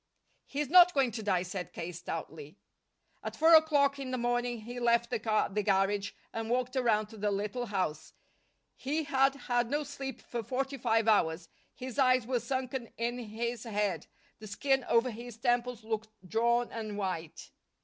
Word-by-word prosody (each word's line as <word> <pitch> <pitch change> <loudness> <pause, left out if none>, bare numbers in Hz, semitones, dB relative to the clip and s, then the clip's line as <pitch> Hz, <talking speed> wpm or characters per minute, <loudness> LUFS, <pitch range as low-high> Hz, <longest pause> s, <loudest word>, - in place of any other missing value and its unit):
"He's 290 +1 -2
not 360 -1 +8
going 265 -4 +3
to 220 +1 -5
die," 190 -4 +1
said 180 -1 -6
K. 170 +1 -5
stoutly. 160 -1 -7 0.6
At - - -5
four 325 +2 +5
o'clock 290 -3 +5
in 270 -2 -5
the 255 - -2
morning 240 -1 -1
he 240 +3 -7
left 235 0 +2
the 240 - 0
car 215 -1 +1
at - - -8
the 210 - +1
garage 200 0 +1 0.2
and 225 0 -4
walked 250 +2 0
around 225 -5 +2
to 220 - -12
the 210 0 0
little 210 +5 -2
house. 185 -7 -2 0.6
He 300 +4 -2
had 270 -1 +2
had 245 -3 -1
no 295 +2 0
sleep 275 -2 -6
for 240 - -4
forty 270 +4 -3
five 225 -1 +2
hours; 165 -5 +2 0.3
his 255 +2 -6
eyes 255 -2 +4
were 250 0 0
sunken 255 0 -3
in 240 +2 -2
his 235 +1 -4
head; 210 -4 -1 0.3
the 215 - -9
skin 270 +6 +1
over 235 +2 +2
his 235 0 -9
temples 240 -1 0
looked 220 0 -3 0.2
drawn 235 +4 +1
and 215 -2 -5
white. 180 -5 -4
235 Hz, 180 wpm, -31 LUFS, 210-255 Hz, 0.6 s, not